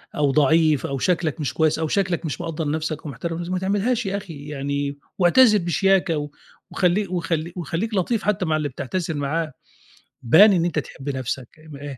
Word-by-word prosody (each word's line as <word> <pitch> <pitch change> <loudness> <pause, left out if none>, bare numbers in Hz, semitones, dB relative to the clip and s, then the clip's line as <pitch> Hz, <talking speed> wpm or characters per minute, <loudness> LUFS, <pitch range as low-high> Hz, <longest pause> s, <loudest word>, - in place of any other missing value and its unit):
أو 145 -2 +2
ضعيف 155 0 +3
أو 140 - -3
شكلك 170 -1 0
مش 145 - -2
كويس 160 -1 +1
أو 160 - 0
شكلك 180 -2 0
مش 155 +2 -4
مقدّر 160 -2 -3
نفسك 155 0 -3
ومحترم 165 +3 -4
نفسك، 175 +1 -5
ما 185 - 0
تعملهاش 205 +5 0
يا 195 +1 -1
أخي 160 -8 -9
يعني 140 0 -3 0.2
واعتذر 210 +5 +6
بشياكة 175 -4 +1 0.4
وخلي 195 +3 +1
وخليك 170 -1 -3
وخليك 180 +6 -3
لطيف 210 +3 0
حتى 195 -3 0
مع 155 -2 +1
اللي 150 -2 -2
بتعتذر 160 +6 -3
معاه، 150 +3 -2 0.7
بان 190 - +7
إن 170 -2 +2
أنت 170 -3 0
تحب 140 -1 -7
نفسك 130 +1 -5 0.2
آآ 140 -2 -7
165 Hz, 175 wpm, -23 LUFS, 145-185 Hz, 0.7 s, بان